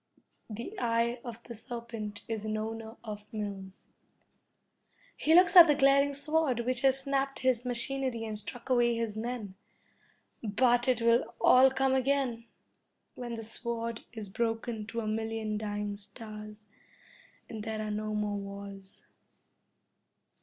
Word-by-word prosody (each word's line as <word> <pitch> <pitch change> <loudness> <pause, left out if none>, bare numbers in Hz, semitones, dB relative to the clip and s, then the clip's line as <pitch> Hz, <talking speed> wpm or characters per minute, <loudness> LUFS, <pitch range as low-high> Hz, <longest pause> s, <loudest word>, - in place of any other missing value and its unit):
The 235 - -6
eye 235 0 +1
of 235 -1 -8
the 235 - -8
serpent 230 -3 -6
is 220 -2 -3
an 215 0 -2
owner 225 +1 -5
of 210 -2 -8
mills. 200 -3 -6 1.3
He 320 +2 +3
looks 360 +2 +6
at 345 -2 +12
the 295 - +4
glaring 275 0 +4
sword 295 -4 +1
which 250 +1 -1
has 270 0 +4
snapped 275 0 -1
his 255 -1 +1
machinery 250 -1 -1
and 215 -1 -4
struck 215 +4 -7
away 240 -1 +4
his 230 -2 -2
men. 220 -3 -4 0.9
But 240 +3 +2
it 245 -3 +2
will 230 0 +3
all 260 +1 +7
come 265 0 +1
again, 260 -3 +1 0.7
when 240 -1 -5
the 225 - -6
sword 230 0 -4
is 220 -3 -6
broken 225 +1 -2
to 230 +1 -3
a 215 - -4
million 220 -1 -2
dying 205 -1 -3
stars, 215 0 -9 0.8
and 220 -2 -6
there 220 0 -3
are 215 - -3
no 215 0 -2
more 210 -1 -1
wars. 200 -1 -8
230 Hz, 140 wpm, -30 LUFS, 215-255 Hz, 1.3 s, at